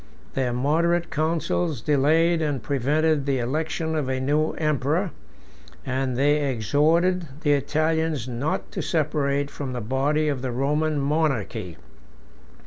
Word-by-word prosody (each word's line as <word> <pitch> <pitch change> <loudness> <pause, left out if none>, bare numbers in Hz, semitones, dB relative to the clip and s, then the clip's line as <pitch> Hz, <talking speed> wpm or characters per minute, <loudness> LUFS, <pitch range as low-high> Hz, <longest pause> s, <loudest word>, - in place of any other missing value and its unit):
Their 130 -2 0
moderate 165 +7 +1
councils 160 -1 0
delayed 160 +6 +3
and 145 -6 -1
prevented 145 +2 +1
the 135 -1 +1
election 160 +5 -2
of 145 -4 -1
a 130 0 -1
new 150 +4 +1
emperor, 155 +4 0 0.7
and 130 -1 -1
they 145 +1 +2
exhorted 160 - +2
the 145 - +2
Italians 155 -1 0
not 125 +5 -3
to - - -3
separate 145 -3 0
from 135 -3 -5
the 125 - -3
body 135 +7 0
of 140 -4 -1
the 130 -1 -2
Roman 150 +4 0
monarchy. 140 - -1
145 Hz, 130 wpm, -24 LUFS, 135-160 Hz, 0.7 s, delayed